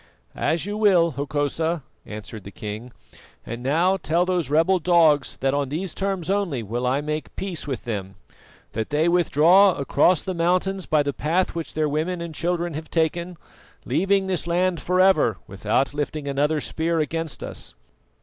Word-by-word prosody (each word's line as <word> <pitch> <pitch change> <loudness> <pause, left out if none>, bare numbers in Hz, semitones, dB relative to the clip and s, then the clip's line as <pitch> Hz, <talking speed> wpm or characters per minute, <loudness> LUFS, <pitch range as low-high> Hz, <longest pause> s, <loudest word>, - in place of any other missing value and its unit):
"As 165 +2 0
you 205 +1 -3
will, 185 -6 +4
Hokosa," 145 +3 -1 0.2
answered 105 0 -8
the 100 - -9
king. 110 +4 -7 0.5
"And 120 +1 -6
now 165 +9 +2
tell 170 0 +1
those 180 -4 -1
rebel 165 +5 +3
dogs 160 -5 +3
that 135 0 +1
on 140 -2 0
these 170 +5 -3
terms 195 -4 -2
only 190 - 0
will 120 +4 -2
I 135 +3 +1
make 150 +1 -4
peace 180 -6 -5
with 135 -3 -4
them 100 -4 -4 0.6
that 110 0 -3
they 150 +3 +2
withdraw 175 +3 +5
across 145 +5 +2
the 190 - -3
mountains 180 +2 0
by 155 -2 +3
the 140 0 -2
path 170 +7 0
which 165 -1 -6
their 155 -1 +1
women 160 +5 -1
and 170 -1 -6
children 175 +1 -1
have 155 +2 -6
taken, 170 +2 -1 0.5
leaving 190 +8 +2
this 185 -3 -2
land 175 -1 +1
for 180 +4 0
ever 185 - +4
without 105 +8 -1
lifting 145 0 -3
another 145 +3 +1
spear 165 +3 -1
against 160 +1 -3
us. - - -7
160 Hz, 170 wpm, -23 LUFS, 140-180 Hz, 0.6 s, withdraw